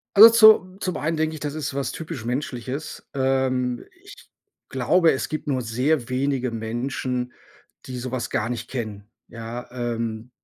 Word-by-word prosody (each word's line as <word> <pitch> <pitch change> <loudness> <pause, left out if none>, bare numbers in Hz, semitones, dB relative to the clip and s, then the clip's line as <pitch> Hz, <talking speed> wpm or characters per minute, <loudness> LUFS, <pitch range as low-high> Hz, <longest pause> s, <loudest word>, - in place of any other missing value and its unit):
Also, 220 +3 +12 0.4
zu - - -16
zum 185 - -2
einen 160 +2 -1
denke 160 0 0
ich, - - -8
das 145 -1 -3
ist 145 -3 -3
was 140 -1 -2
typisch 155 -8 -6
Menschliches. 130 +3 -4
Ähm, 130 -2 0 0.2
ich - - -12 0.5
glaube, 160 +7 +3
es 130 - -3
gibt 155 0 -4
nur 130 -3 0
sehr 125 +3 0
wenige 130 -1 0
Menschen, 125 +2 -3 0.5
die 125 -1 -6
sowas 125 -1 -3
gar 110 +2 -1
nicht 120 -1 -4
kennen, 110 -4 -5 0.2
ja, 115 +1 -7
ähm 115 -1 -3
130 Hz, 155 wpm, -24 LUFS, 120-145 Hz, 0.5 s, Also